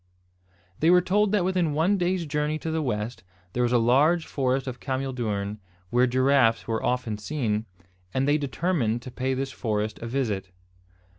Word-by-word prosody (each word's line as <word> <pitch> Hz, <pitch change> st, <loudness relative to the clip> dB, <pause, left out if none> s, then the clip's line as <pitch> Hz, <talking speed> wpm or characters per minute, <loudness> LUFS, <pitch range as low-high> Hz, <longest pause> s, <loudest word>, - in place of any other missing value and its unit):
They 160 Hz, -, +4 dB
were 180 Hz, 0 st, +7 dB
told 200 Hz, +2 st, +2 dB
that 205 Hz, -4 st, +2 dB
within 180 Hz, -5 st, +1 dB
one 175 Hz, +7 st, +2 dB
day's 180 Hz, -1 st, 0 dB
journey 150 Hz, +1 st, -1 dB
to 160 Hz, +1 st, -4 dB
the 160 Hz, 0 st, 0 dB
west, 110 Hz, -3 st, -3 dB, 0.3 s
there 125 Hz, -, 0 dB
was 120 Hz, -1 st, +2 dB
a 125 Hz, -, +4 dB
large 145 Hz, +9 st, +3 dB
forest 130 Hz, -1 st, 0 dB
of 125 Hz, -2 st, -5 dB
cameel 135 Hz, 0 st, -2 dB
doorn, 105 Hz, -4 st, -3 dB, 0.3 s
where 125 Hz, +1 st, +4 dB
giraffes 130 Hz, -2 st, +3 dB
were 115 Hz, -1 st, -1 dB
often 120 Hz, -4 st, -1 dB
seen, 110 Hz, -4 st, -2 dB, 0.4 s
and 130 Hz, +5 st, 0 dB
they 150 Hz, +1 st, +3 dB
determined 135 Hz, -5 st, -1 dB
to 130 Hz, -, -8 dB
pay 130 Hz, +2 st, -1 dB
this 135 Hz, +1 st, -3 dB
forest 110 Hz, -3 st, -2 dB
a 115 Hz, -, -5 dB
visit. 110 Hz, -7 st, -2 dB
130 Hz, 175 wpm, -26 LUFS, 115-155 Hz, 0.4 s, were